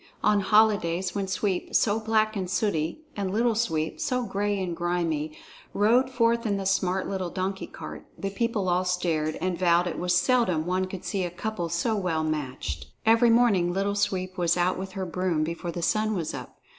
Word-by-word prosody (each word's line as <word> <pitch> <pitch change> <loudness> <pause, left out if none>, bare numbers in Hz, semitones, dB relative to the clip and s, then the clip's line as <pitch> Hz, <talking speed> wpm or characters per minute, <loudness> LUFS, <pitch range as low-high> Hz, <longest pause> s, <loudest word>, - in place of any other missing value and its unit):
On 210 -1 +4
holidays, 200 -4 +3
when 200 -1 -2
Sweep, 190 -1 -2
so 215 0 +3
black 220 0 +1
and 185 -3 -3
sooty, 190 - -1
and 195 -2 -2
Little 230 +3 +2
Sweep, 160 -9 -1
so 250 -2 0
gray 205 -1 -1
and 180 -3 -2
grimy, 165 -3 -1 0.4
rode 235 +6 +4
forth 235 -2 +2
in 200 -1 0
the 195 - -4
smart 190 -1 +1
little 190 -2 -2
donkey 190 +2 -3
cart, - - -9
the 195 - -3
people 215 -2 -1
all 180 +1 +2
stared 170 -4 0
and 180 -1 -2
vowed 175 -1 +4
it 175 - -3
was 180 0 +1
seldom 185 -7 +2
one 185 +1 0
could 185 -1 -8
see 195 -2 -1
a 175 - -2
couple 175 0 -4
so 170 +7 0
well 180 -6 -1
matched. 130 - -3 0.2
Every 230 +2 +5
morning 225 -7 +4
Little 195 +2 0
Sweep 185 -2 -1
was 175 0 +2
out 180 +1 +2
with 190 0 -6
her 190 -1 -3
broom, 175 -2 0
before 170 +2 -4
the 170 0 -5
sun 215 +3 +1
was 165 -4 -3
up. - - -8
185 Hz, 195 wpm, -26 LUFS, 175-210 Hz, 0.4 s, Every